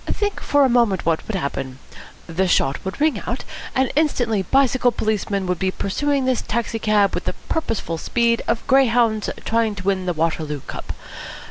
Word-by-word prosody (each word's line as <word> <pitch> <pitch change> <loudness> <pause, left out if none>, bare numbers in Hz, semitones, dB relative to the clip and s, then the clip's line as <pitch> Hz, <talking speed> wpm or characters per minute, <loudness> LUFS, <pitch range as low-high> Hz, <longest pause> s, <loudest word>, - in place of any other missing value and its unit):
Think 410 -1 -1
for 285 -1 +3
a - - +5
moment 235 -7 +2
what 165 -1 0
would 220 - -3
happen. 135 -5 -3 0.5
The 180 +3 0
shot 135 -5 +1
would 190 +5 -5
ring 310 0 +2
out, - - -3 0.3
and 260 -1 +2
instantly 245 -9 +1
bicycle 255 +3 +3
policemen 205 -3 -1
would 180 -2 -1
be 190 - +1
pursuing 275 +9 -1
this 255 -2 +1
taxi 230 0 -2
cab 210 -2 +3
with - - -3
the - - -1 0.2
purposeful 225 - -2
speed 235 +3 +1
of 230 - 0
greyhounds 235 -5 +3 0.2
trying 225 -2 +1
to 190 - -7
win 190 -1 0
the 175 - +1
Waterloo 155 -3 -1
Cup. - - -7
220 Hz, 175 wpm, -21 LUFS, 185-250 Hz, 0.5 s, a